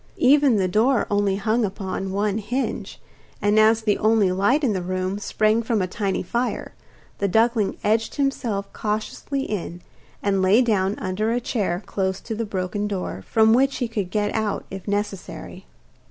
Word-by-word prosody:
Even 280 -1 +5
the 190 -3 +2
door 225 +7 +2
only 205 -1 +2
hung 220 +4 +1
upon 190 -1 -3
one 205 +2 0
hinge, 245 +6 -3 0.4
and 205 +1 +3
as 220 +1 +4
the 210 -2 +1
only 215 -3 +3
light 205 +11 +2
in 240 -6 +2
the 185 - -2
room 185 +2 -2
sprang 215 +2 +1
from 230 -1 0
a 185 - +1
tiny 195 +1 -2
fire, 235 +7 -2 0.5
the 200 - +1
duckling 225 +1 +2
edged 220 +2 +1
himself 240 -8 -1
cautiously 220 +6 -3
in, 180 -6 -5 0.4
and 195 -1 +1
lay 190 +5 +5
down 200 -4 +1
under 210 +3 -1
a 240 - +1
chair 205 -6 -2
close 190 -1 -2
to 230 - -6
the 225 +1 -2
broken 200 +1 -2
door, 185 - -4
from 220 0 +4
which 270 +3 +3
he 245 - -1
could 205 -5 -3
get 205 +1 -1
out 220 -2 -1
if 190 0 -8
necessary. 205 -2 -4
210 Hz, 170 wpm, -23 LUFS, 195-225 Hz, 0.5 s, Even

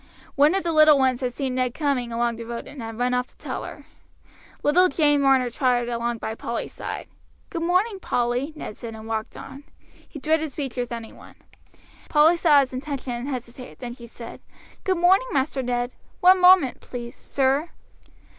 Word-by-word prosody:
One 295 +5 +4
of 390 - 0
the 340 - 0
little 310 -2 +6
ones 260 -2 +1
had 250 -1 -1
seen 265 +1 -3
Ned 255 -1 -1
coming 275 -6 -1
along 235 0 0
the 230 - -6
road 235 0 -6
and 275 -2 -9
had 225 -1 -7
run 250 +1 0
off 250 0 0
to - - -23
tell - - -5
her. - - -9 0.8
Little 360 +5 +5
Jane 290 -4 +3
Marner 265 -3 +3
trotted 245 -2 +1
along 235 0 -2
by 220 - -4
Polly's 235 +1 -5
side. - - -6 0.4
"Good 335 - -3
morning, 375 +5 +1
Polly!" 245 -1 -1
Ned 215 - -7
said, 230 -2 -8
and 220 0 -10
walked 220 -1 -4
on. 275 +1 -10 0.5
He - - -9
dreaded 315 +1 0
speech 270 -2 -5
with 245 -1 -3
any 230 -1 -6
one. - - -15 0.7
Polly 310 +3 +5
saw 310 -4 +5
his 260 -1 -4
intention 265 -1 -4
and 240 +2 -5
hesitated; 250 -2 -7
then 240 -1 -6
she 235 -1 -12
said: 230 0 -10 0.4
"Good 375 -2 +1
morning, 375 +8 +4
Master 270 0 0
Ned! 245 0 -2 0.3
One 370 +1 +6
moment, 360 -7 +6
please, 240 -1 -8
sir." 275 +4 0
260 Hz, 190 wpm, -24 LUFS, 240-305 Hz, 0.8 s, little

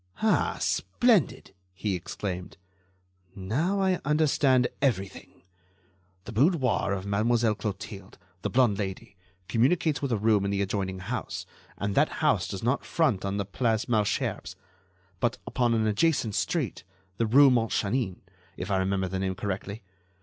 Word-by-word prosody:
"Ah! 220 - +2
splendid!" 230 - +1 0.2
he 100 +1 -2
exclaimed. 90 0 -5 0.8
"Now 145 - -1
I 190 -2 +2
understand 140 -4 +3
everything. 100 -11 -2 0.8
The - - -7
boudoir 130 - +2
of 95 -1 -2
Mademoiselle 110 +3 +2
Clotilde—the 100 -3 -7
blonde 120 -5 +3
Lady—communicates 100 - -1
with 140 -3 -2
a 115 - +2
room 105 -1 +3
in 100 - -1
the 100 0 0
adjoining 95 -1 -2
house, 105 +8 -5 0.3
and 100 0 -2
that - - +2
house - - +2
does 95 - -6
not 125 +4 +1
front 145 - +1
on 100 0 -2
the 100 - -1
Place 110 +2 0
Malesherbes, 110 -4 -1 0.6
but 120 +2 0
upon 120 -2 +1
an 110 -1 +1
adjacent 110 +1 +1
street, 140 - -1 0.3
the 115 - +1
rue 135 +4 +7
Montchanin, 115 -3 0 0.4
if - - -4
I 95 - +2
remember 95 0 0
the 95 +1 -3
name 95 -1 -1
correctly.... 100 +2 -4
110 Hz, 135 wpm, -27 LUFS, 95-130 Hz, 0.8 s, rue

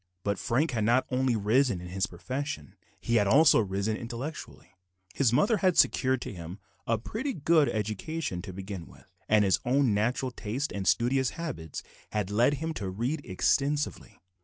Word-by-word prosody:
But 100 0 -1
Frank 130 +6 +1
had 115 -4 -1
not 120 +4 +3
only 130 -1 +1
risen 110 +1 +2
in 90 0 -8
his 95 +1 -1
profession; 130 - -5 0.3
he 115 - +1
had 105 -2 +3
also 140 +8 +6
risen 100 +1 -1
intellectually. 120 - -7 0.4
His 130 -5 +2
mother 205 - +3
had 185 -2 +2
secured 130 -1 +3
to - - -6
him 85 +1 -8 0.3
a 115 - +2
pretty 230 - -4
good 155 -2 +3
education 110 - -3
to 95 +1 -8
begin 95 -2 -7
with, - - -19 0.2
and 105 -1 +5
his 95 - +3
own 130 -2 +2
natural 120 +5 0
taste 125 +5 -3
and 100 -2 -4
studious 130 +2 +2
habits 125 - -5 0.3
had 105 -2 -1
led 120 +7 +3
him 160 +3 -3
to 100 -9 -4
read 120 +11 -2
extensively. 145 +10 0
120 Hz, 170 wpm, -28 LUFS, 100-140 Hz, 0.4 s, also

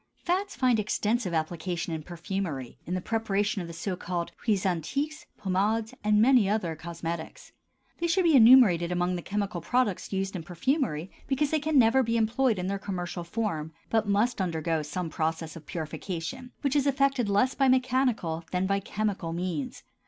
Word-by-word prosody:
Fats 380 +3 -1
find 255 -4 +3
extensive 215 0 0
application 165 +1 -2
in 160 - -3
perfumery, 170 - -5
in 180 - -1
the 185 - -2
preparation 205 -2 0
of 170 - -6
the - - -7
so 180 +3 -3
called 175 -1 -3 0.2
huiles 205 -3 +2
antiques, 275 - -2
pomades, 210 +3 0
and 210 0 +4
many 235 -3 +5
other 185 -6 0
cosmetics. 165 0 -6 0.5
They 340 - 0
should 365 +3 +2
be 330 -3 +5
enumerated 220 -9 +7
among 180 0 0
the 175 - -4
chemical 200 -2 -3
products 245 -4 0
used 195 0 -2
in 180 - -3
perfumery 180 - -1 0.2
because 280 +1 +1
they 315 - +2
can 305 0 +1
never 250 +1 +5
be 230 -2 0
employed 230 +1 +2
in 180 - -2
their 195 +1 -2
commercial 180 -3 -4
form, 170 -5 -3 0.2
but 225 -2 +2
must 205 +3 +1
undergo 165 -2 -1
some 160 +3 -4
process 160 0 -2
of 165 - -11
purification, 180 - -5
which 280 -1 0
is 285 -1 +3
effected 275 -4 +2
less 205 +7 +3
by 270 - +2
mechanical 255 -10 +1
than 180 +1 0
by 195 +1 +1
chemical 195 -4 -2
means. 170 -5 -3
195 Hz, 175 wpm, -28 LUFS, 170-245 Hz, 0.5 s, enumerated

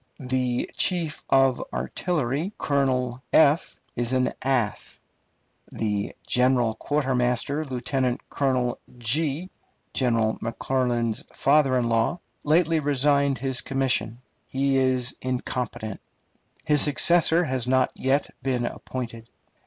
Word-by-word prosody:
The 125 -1 -1
chief 170 -5 0
of 135 -2 +3
artillery, 160 - -2
Colonel, 130 -3 0 0.7
is 120 +1 0
an 130 0 +1
ass. 130 -5 -1 0.7
The 105 -2 -2
chief 125 +1 +3 0.2
quartermaster, 135 0 0
Lieutenant 130 0 -2
Colonel, 130 -3 0 0.2
General 130 -4 -1
McClernand's 120 -1 -1
father 140 -2 +3
in 120 -1 +1
law, 115 +9 +1 0.2
lately 165 +1 +3
resigned 140 -1 +2
his 130 -2 -1
commission. 130 -4 0 0.3
He 135 0 +1
was 130 -1 +1
incompetent.... 125 -4 -3 0.6
His 150 -2 +3
successor 165 +4 +3
has 130 -5 -1
not 130 0 +3
yet 135 +2 0
been 125 -3 -1
appointed. 115 -3 -6
130 Hz, 100 wpm, -25 LUFS, 125-140 Hz, 0.7 s, of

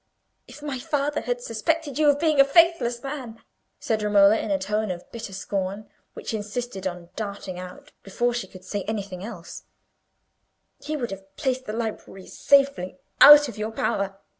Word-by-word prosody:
"If 275 +4 -13
my 280 -4 -4
father 290 +2 -1
had - - -3
suspected 320 - -2
you 300 -1 +5
of 285 - +3
being 310 -2 +2
a - - +10
faithless 275 -5 +3
man," 265 -5 -6 0.4
said 220 -1 -1
Romola, 205 0 +5
in - - -4
a 195 - +2
tone 210 +3 -2
of 175 -1 -5
bitter 230 -3 -7
scorn, 195 +2 -4 0.2
which - - -6
insisted 210 -2 -4
on 175 -1 -7
darting 200 -4 -5
out 180 0 -10
before 240 +5 -1
she 240 -5 -3
could 185 0 -14
say 200 +1 -3
anything 200 -4 -4
else, 200 -6 -9 1.2
"he 300 +2 -3
would 240 -6 -4
have 195 0 -10
placed 260 -1 -1
the 215 - -5
library 220 -4 -5
safely 275 -10 +2 0.2
out 295 0 +10
of 220 -4 -9
your 215 +1 -2
power. 195 -3 -2
220 Hz, 170 wpm, -24 LUFS, 195-275 Hz, 1.2 s, a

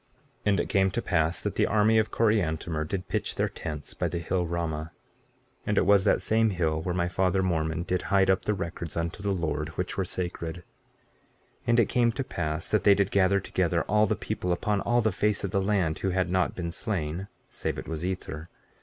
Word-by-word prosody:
15:11 - - -40 0.4
And 100 -3 +3
it - - -5
came 95 -1 +3
to 110 +5 -2
pass 80 -1 +1
that - - -1
the - - +2
army 110 +1 +4
of 110 - +1
Coriantumr 85 -8 +1
did 90 +1 -3
pitch - - -2
their - - +1
tents 75 -2 -7
by 90 - -1
the 85 +1 -3
hill 90 +1 -1
Ramah; 80 -2 -3 0.7
and 105 - -1
it - - +4
was 100 -1 +5
that - - +3
same 110 +3 +3
hill 80 -5 0
where 90 +2 -2
my 85 -1 +1
father 95 +1 +1
Mormon 80 -2 0
did 90 0 -1
hide 95 -1 +4
up 95 - 0
the 105 - +1
records 85 -3 -5
unto 85 +2 -3
the 100 - -1
Lord, 80 -5 -1
which 90 - -2
were 95 - +1
sacred. 85 -2 -4
15:12 90 - -11 1.0
And 120 0 +4
it 110 - 0
came 120 -1 +3
to 135 - -2
pass 80 -7 -3
that 110 -3 +2
they 100 -1 +7
did 100 0 +1
gather 100 0 +3
together - - 0
all 105 +1 +3
the - - +1
people 90 - -3
upon 100 +3 0
all 120 0 +2
the 110 -1 +2
face 105 +3 0
of 100 - -2
the 100 - +1
land, 95 -6 +1
who 95 - 0
had 90 -1 0
not 95 -1 +1
been 85 -2 -3
slain, 90 -1 -3 0.2
save - - -3
it - - -6
was 80 0 -4
Ether. 85 -3 -4
90 Hz, 225 wpm, -27 LUFS, 85-100 Hz, 1.0 s, they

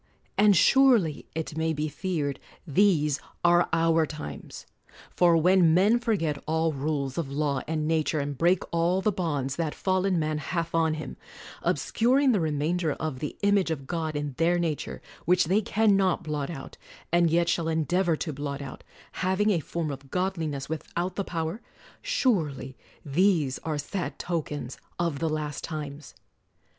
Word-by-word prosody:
And 205 0 +5
surely 240 - +4
it 160 -1 -4
may 160 0 0
be 150 0 -2
feared, 150 -3 -3 0.3
these 150 -4 +3 0.3
are 175 0 +4
our 165 -1 +3
times. 145 - -8 0.5
For 170 -2 +5
when 175 -1 +5
men 205 +6 +4
forget 170 -12 -1
all 160 0 +1
rules 140 0 -2
of 140 -5 -3
law 140 -2 0
and 155 -1 -1
nature, 160 -1 +1
and 145 0 -3
break 175 +6 +2
all 170 +3 +1
the 215 - +2
bonds 145 -8 -2
that 160 -3 -2
fallen 185 -1 +1
man 155 -1 -1
hath 165 +3 -3
on 160 -1 +2
him, 155 - -7 0.4
obscuring 260 +4 +2
the 210 - +2
remainder 160 +1 0
of 155 -5 -4
the 150 - -5
image 200 -3 +3
of 145 -4 -3
God 160 0 -3
in 145 -1 -3
their 170 +2 +3
nature, 165 -4 -3 0.2
which 180 0 +4
they 190 +6 +2
can 215 0 +3
not 190 -2 +1
blot 150 -3 -3
out, 145 -6 -8 0.3
and 170 0 +4
yet 170 +1 +2
shall 170 -1 0
endeavor 165 +2 +1
to 155 0 -4
blot 140 0 -4
out, 140 -2 -8 0.2
" - - -27 0.2
having 205 +3 +2
a 180 - +2
form 160 0 -3
of 135 0 -9
godliness 165 -6 -2
without 170 +3 -4
the 200 - -1
power," 165 +4 -3 0.2
— - - -25 0.2
surely 150 - 0 0.3
these 155 -3 +2
are 155 -2 -3
sad 145 -1 -4
tokens 150 -6 -4 0.2
of 170 -5 -1
the 165 - 0
last 150 -1 -3
times 150 -2 -6
160 Hz, 165 wpm, -27 LUFS, 150-180 Hz, 0.5 s, And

